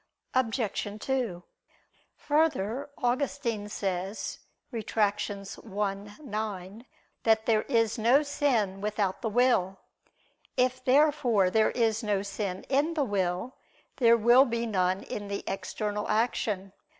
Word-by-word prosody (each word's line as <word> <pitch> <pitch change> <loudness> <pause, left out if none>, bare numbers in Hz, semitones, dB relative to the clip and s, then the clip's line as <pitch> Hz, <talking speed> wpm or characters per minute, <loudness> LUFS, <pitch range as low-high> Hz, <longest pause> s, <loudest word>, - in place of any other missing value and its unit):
Obj. 230 -5 0
2: 235 -9 -2 0.7
Further, 290 -4 0
Augustine 245 -4 -1
says 195 0 -3 0.3
(Retract. 210 -3 0
i, 200 0 -4 0.3
9) 210 -2 -5 0.4
that 220 -1 +3
there 220 -2 +3
is 230 0 +1
no 245 +7 +5
sin 235 -10 0
without 205 -2 -1
the 225 - -1
will. 210 -5 +2 0.8
If 255 0 +1
therefore 255 -8 +3
there 220 +1 +4
is 225 -2 +1
no 205 -3 0
sin 195 -2 -4
in 290 +5 +1
the 300 - +2
will, 190 +2 -2 0.4
there 235 -3 +5
will 240 +4 +6
be 235 -2 -2
none 185 -3 0
in 205 -1 -6
the 200 0 -4
external 205 +2 -3
action. 210 -3 0
220 Hz, 115 wpm, -28 LUFS, 200-250 Hz, 0.8 s, will